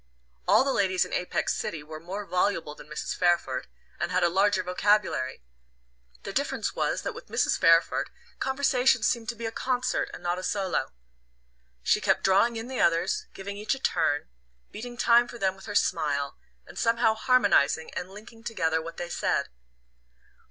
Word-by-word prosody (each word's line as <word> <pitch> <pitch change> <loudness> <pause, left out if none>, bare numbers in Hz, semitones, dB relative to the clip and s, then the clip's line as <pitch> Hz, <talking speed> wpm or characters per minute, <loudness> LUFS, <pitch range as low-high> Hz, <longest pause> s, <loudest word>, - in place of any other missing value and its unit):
All - - +6
the 270 0 0
ladies 185 -2 +2
in - - -9
Apex 180 - 0
City 155 -3 -4
were 155 +1 -9
more 190 +5 -6
voluble 180 -5 0
than - - -13
Mrs. 150 - -4
Fairford, 175 -7 +1 0.3
and 175 - -2
had 180 0 +2
a 175 - +4
larger 190 +1 +2
vocabulary: 180 - +1 0.8
the - - -6
difference - - -1
was - - -1
that - - -3
with - - -11
Mrs. - - +1
Fairford 165 0 +4 0.3
conversation 265 -3 +2
seemed 230 0 0
to 240 - -3
be 230 +1 -6
a 225 - -2
concert 255 +2 -1
and - - -10
not 175 +1 -1
a - - -7
solo. 190 0 -1 0.9
She - - +3
kept - - +2
drawing 200 +5 +4
in 225 +1 -5
the 260 -1 -2
others, 175 - +1
giving 200 +1 -6
each 210 +6 -1
a - - -10
turn, 160 - 0 0.4
beating 240 +3 -8
time 240 0 +5
for 240 - -9
them 190 -3 0
with 195 - -13
her 205 - -5
smile, 145 -7 +1 0.3
and - - -9
somehow 230 -1 +3
harmonizing 220 - +3
and 180 - -5
linking 220 +3 -13
together 160 -8 0
what 165 +1 -8
they 175 - -4
said. 175 - -1
195 Hz, 175 wpm, -27 LUFS, 170-230 Hz, 0.9 s, All